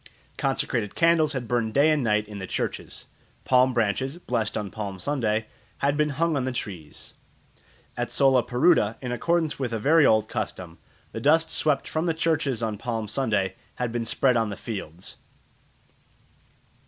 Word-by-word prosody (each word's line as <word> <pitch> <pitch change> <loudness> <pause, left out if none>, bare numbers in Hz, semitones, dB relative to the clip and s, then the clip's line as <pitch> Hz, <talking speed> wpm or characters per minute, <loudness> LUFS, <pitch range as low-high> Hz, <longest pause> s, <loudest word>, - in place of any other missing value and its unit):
Consecrated 105 -4 -1
candles 165 -3 +3
had 125 -3 -4
burned 115 -2 -1
day 145 +3 +5
and 150 -3 +1
night 105 -2 +1
in 105 -1 -8
the 95 - -6
churches. - - -4 0.4
Palm 130 0 +4
branches, 125 +5 0
blessed 120 - -2
on 105 -3 -4
Palm 100 -3 -5
Sunday, 110 -3 -1 0.3
had 140 +1 +1
been 150 0 +1
hung 165 0 +1
on 135 - 0
the 130 - -1
trees. 90 -10 -7 0.8
At - - -2
Solaparuta, 130 -2 +3
in 125 -2 -5
accordance 160 +5 0
with 130 -3 -2
a 115 - -1
very 155 +7 +4
old 110 -1 +3
custom, 95 -7 -5 0.3
the 115 - -6
dust 160 +4 +3
swept 150 -3 +1
from 160 +2 -1
the 165 - +1
churches 150 -7 0
on 110 -2 -2
Palm 115 -2 -3
Sunday 105 -4 0 0.2
had 125 -2 -2
been 120 0 -2
spread 125 +2 +2
on 115 -2 +1
the 100 - -6
fields. 90 -6 -7
120 Hz, 165 wpm, -25 LUFS, 105-145 Hz, 0.8 s, day